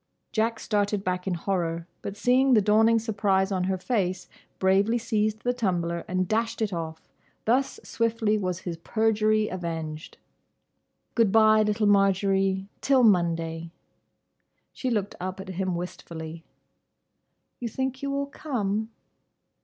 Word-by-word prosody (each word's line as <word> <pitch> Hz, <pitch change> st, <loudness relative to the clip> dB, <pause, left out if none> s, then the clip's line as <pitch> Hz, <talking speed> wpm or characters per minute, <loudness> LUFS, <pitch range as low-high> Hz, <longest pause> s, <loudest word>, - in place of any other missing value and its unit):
Jack 225 Hz, 0 st, 0 dB
started 205 Hz, -1 st, 0 dB
back 180 Hz, 0 st, -2 dB
in 185 Hz, -, 0 dB
horror, 170 Hz, -2 st, -2 dB, 0.2 s
but 200 Hz, -, -6 dB
seeing 255 Hz, +2 st, +4 dB
the 215 Hz, -, +5 dB
dawning 220 Hz, +3 st, +4 dB
surprise 200 Hz, -3 st, +1 dB
on 185 Hz, -2 st, 0 dB
her 190 Hz, 0 st, 0 dB
face, 185 Hz, -2 st, -1 dB, 0.3 s
bravely 195 Hz, +5 st, +3 dB
seized 215 Hz, -2 st, -1 dB
the 245 Hz, -, +1 dB
tumbler 175 Hz, -7 st, -1 dB
and 185 Hz, 0 st, 0 dB
dashed 225 Hz, +2 st, 0 dB
it 215 Hz, -3 st, -1 dB
off. 160 Hz, -1 st, -5 dB, 0.4 s
Thus 255 Hz, +5 st, +1 dB
swiftly 230 Hz, -2 st, 0 dB
was 185 Hz, -3 st, -2 dB
his 170 Hz, -2 st, -5 dB
perjury 215 Hz, +3 st, +1 dB
avenged. 165 Hz, -4 st, -5 dB, 1.0 s
"Good 230 Hz, -4 st, +3 dB
bye, 215 Hz, 0 st, +6 dB
little 210 Hz, 0 st, +1 dB
Marjory. 195 Hz, -1 st, +2 dB
Till 270 Hz, -2 st, +4 dB
Monday!" 165 Hz, -5 st, +2 dB, 1.0 s
She 260 Hz, -, -3 dB
looked 210 Hz, -4 st, -1 dB
up 185 Hz, +1 st, -4 dB
at 190 Hz, 0 st, -8 dB
him 185 Hz, 0 st, -2 dB
wistfully. 165 Hz, -2 st, -7 dB, 1.1 s
"You 240 Hz, -, -3 dB
think 265 Hz, +2 st, -3 dB
you 280 Hz, -, -2 dB
will 280 Hz, 0 st, -1 dB
come?" 220 Hz, -7 st, -2 dB
200 Hz, 135 wpm, -26 LUFS, 180-225 Hz, 1.1 s, bye